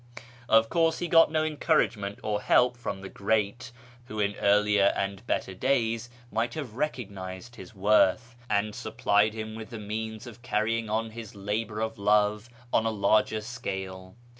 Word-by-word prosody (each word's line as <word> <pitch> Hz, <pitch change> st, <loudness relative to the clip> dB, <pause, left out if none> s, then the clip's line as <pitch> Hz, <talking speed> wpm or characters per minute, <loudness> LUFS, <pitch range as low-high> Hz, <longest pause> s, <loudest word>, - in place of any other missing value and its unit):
Of 110 Hz, 0 st, +5 dB
course 165 Hz, +4 st, +2 dB
he 175 Hz, -, -2 dB
got 165 Hz, -1 st, +6 dB
no 155 Hz, 0 st, +1 dB
encouragement 145 Hz, -10 st, 0 dB
or 105 Hz, -1 st, -1 dB
help 125 Hz, 0 st, +4 dB
from 120 Hz, -5 st, -5 dB
the 95 Hz, -, -7 dB
great, 110 Hz, +6 st, -1 dB, 0.3 s
who 110 Hz, -2 st, -6 dB
in 100 Hz, 0 st, +1 dB
earlier 105 Hz, 0 st, +4 dB
and 100 Hz, +1 st, -3 dB
better 95 Hz, -, -1 dB
days 115 Hz, +1 st, 0 dB, 0.2 s
might 115 Hz, +2 st, -1 dB
have 140 Hz, -8 st, -5 dB
recognised 110 Hz, -5 st, -5 dB
his 110 Hz, -, -12 dB
worth, 105 Hz, +4 st, +3 dB
and 105 Hz, 0 st, +1 dB
supplied 105 Hz, +2 st, +1 dB
him 110 Hz, 0 st, -5 dB
with 110 Hz, 0 st, -8 dB
the 115 Hz, -, -7 dB
means 110 Hz, +1 st, -5 dB
of 120 Hz, -1 st, -11 dB
carrying 115 Hz, -1 st, -1 dB
on 110 Hz, +1 st, -1 dB
his 110 Hz, -2 st, -9 dB
labour 105 Hz, +2 st, -3 dB
of 110 Hz, -1 st, -3 dB
love 105 Hz, +2 st, +2 dB, 0.2 s
on 115 Hz, -, +3 dB
a -, -, +2 dB
larger 110 Hz, +1 st, +2 dB
scale. 95 Hz, -4 st, -6 dB
110 Hz, 165 wpm, -28 LUFS, 105-115 Hz, 0.3 s, got